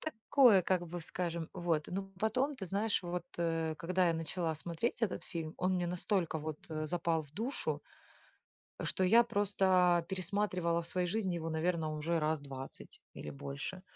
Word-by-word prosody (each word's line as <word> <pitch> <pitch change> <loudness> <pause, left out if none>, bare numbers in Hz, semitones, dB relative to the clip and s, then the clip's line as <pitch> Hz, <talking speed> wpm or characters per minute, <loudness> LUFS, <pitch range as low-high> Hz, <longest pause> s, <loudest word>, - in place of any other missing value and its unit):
Такое, 235 -6 +5
как 175 0 +1
бы 175 +1 -5
скажем, 170 -1 -3
вот, 170 -4 0
ну, 195 +1 -4
потом 255 +7 +1
ты 205 -8 -6
знаешь, 205 +4 0
вот, 175 -1 -3
э, 165 -2 0
когда 180 +3 +2
я 165 - +2
начала 165 0 -1
смотреть 170 +10 -2
этот 210 -5 0
фильм, 160 -2 -5
он 185 +1 +1
мне 180 -1 0
настолько 180 -2 0
вот, 155 0 -4
э, 155 0 -2
запал 165 -1 0
в 145 -2 -17
душу, 230 - -2 1.0
что 190 - 0
я 230 +6 +7
просто 185 -5 +3
пересматривала 185 -2 0
в 165 - -8
своей 180 -1 0
жизни 190 -1 0
его, 165 -1 -3
наверно, 160 0 0
уже 165 +2 0
раз 155 0 +1
20 135 -1 -9
или 75 - -7
больше. 140 - -5
175 Hz, 170 wpm, -34 LUFS, 160-190 Hz, 1.0 s, я